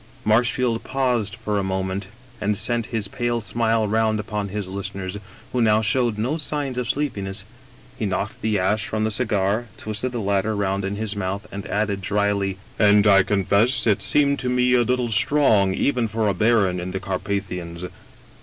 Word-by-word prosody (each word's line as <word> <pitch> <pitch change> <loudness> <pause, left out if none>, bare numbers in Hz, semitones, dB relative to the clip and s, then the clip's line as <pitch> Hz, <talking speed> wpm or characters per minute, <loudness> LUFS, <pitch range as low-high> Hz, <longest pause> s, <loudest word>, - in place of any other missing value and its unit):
Marshfield 120 +1 +2
paused 125 -6 0
for 105 -3 -2
a - - -1
moment 95 0 -2 0.3
and 105 0 0
sent 120 0 -1
his 110 -4 -3
pale 120 +2 -1
smile 115 0 +1
round 110 0 +1
upon 105 -1 -3
his 100 0 -4
listeners, 95 0 -5 0.3
who 125 - +1
now 110 -1 +4
showed 115 0 +1
no 125 +9 -1
signs 145 -4 -3
of 120 -3 -3
sleepiness; 100 -9 -2 0.5
he 110 - 0
knocked 100 +2 -3
the 110 -1 +1
ash 105 +3 0
from 110 0 -1
his 110 - 0
cigar, 110 -1 0
twisted 110 +4 -2
the 120 - -3
latter 100 +1 0
round 100 -1 -1
in 95 +1 -2
his 105 0 -3
mouth, 100 +1 -3
and 100 0 -6
added 100 -1 -1
dryly: 100 -1 0
" - - -25
And 105 0 +5
I 100 -2 +7
confess 100 +5 +2
it 105 -4 +2
seemed 140 -1 +3
to 125 - -1
me 125 0 +2
a 125 - +5
little 125 0 0
strong 105 -4 +3
even 125 -2 +1
for 110 0 -1
a 100 - +2
baron 100 -3 +2
in 90 +1 -4
the 95 +1 -3
Carpathians. 95 -3 -4
105 Hz, 180 wpm, -23 LUFS, 100-120 Hz, 0.5 s, I